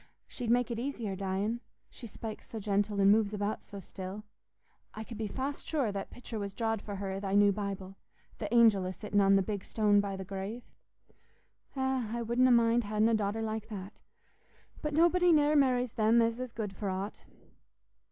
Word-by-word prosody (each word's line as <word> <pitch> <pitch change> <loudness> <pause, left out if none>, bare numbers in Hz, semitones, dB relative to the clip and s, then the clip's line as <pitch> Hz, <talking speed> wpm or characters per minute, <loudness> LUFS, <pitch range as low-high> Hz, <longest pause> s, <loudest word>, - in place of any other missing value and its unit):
She'd 245 -3 -5
make 245 0 +2
it 230 - -2
easier 235 -6 -3
dyin'—she 200 +5 -4
spakes 220 0 -8
so 225 - -6
gentle 205 0 0
an' 195 0 +6
moves 210 -1 +2
about 205 +1 -2
so 200 - -10
still. 190 +2 -7 0.7
I 220 - -5
could 225 -1 -9
be 220 - -1
fast 270 +6 -4
sure 275 -9 0
that 200 -1 -5
pictur' 235 -2 -7
was 200 -1 -5
drawed 225 -2 -1
for 205 - -6
her 195 0 -4
i' 190 - -3
thy 195 0 -2
new 205 0 +6
Bible—th' 195 +1 -7
angel 225 -6 +5
a 185 - -3
sittin' 205 0 0
on 195 0 +5
the 195 - +4
big 200 0 -4
stone 210 -2 +3
by 200 -1 -1
the 190 0 -6
grave. 195 +5 -5 1.1
Eh, 265 -3 0
I 235 - -2
wouldna 240 +3 +3
mind 235 -1 +4
ha'in 215 +1 +2
a - - +2
daughter 215 +1 0
like 220 0 -4
that; 200 -1 -8 0.8
but 300 -1 -2
nobody 345 +2 +4
ne'er 300 -1 +4
marries 255 -4 +3
them 225 +1 +3
as 230 +1 +1
is 255 -2 -4
good 215 -3 -4
for 200 +1 -4
aught." 190 +3 -5
215 Hz, 190 wpm, -31 LUFS, 200-235 Hz, 1.1 s, an